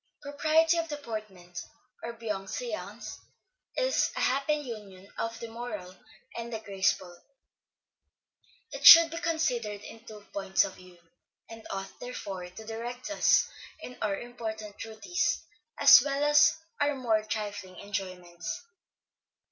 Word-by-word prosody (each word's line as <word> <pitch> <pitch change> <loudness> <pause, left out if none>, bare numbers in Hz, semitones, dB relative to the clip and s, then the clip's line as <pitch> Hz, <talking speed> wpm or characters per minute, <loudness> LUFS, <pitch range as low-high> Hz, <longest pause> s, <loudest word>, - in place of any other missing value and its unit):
_ - - -61
Propriety 315 +3 +3
of 330 - -2
deportment, 215 - -7 0.4
or 235 - -5
bienséance, 215 -1 -5 0.6
is - - +2
a - - -3
happy 275 +3 +2
union 210 -9 -8
of 230 0 -3
the 230 - -6
moral 220 -6 -7 0.4
and 235 0 -5
the 225 - -2
graceful; 190 -3 -1 1.5
it - - -7
should 330 -1 +11
be 330 - -4
considered 250 -12 -1
in 225 +2 -11
two 210 -2 -12
points 195 -1 +2
of 195 - -7
view, 180 -1 -16 0.5
and 225 0 -10
ought 195 0 -6
therefore 195 -7 -6
to 220 +5 -11
direct 240 +5 -6
us 305 - +4 0.3
in 250 - -9
our 210 -2 0
important 220 -3 -7
duties, 335 +11 -1 0.3
as 280 -2 +9
well 280 0 -1
as 295 +1 +5 0.2
our 290 0 +2
more 230 -5 +1
trifling 205 -3 -5
enjoyments. 185 - -5
225 Hz, 130 wpm, -29 LUFS, 195-275 Hz, 1.5 s, should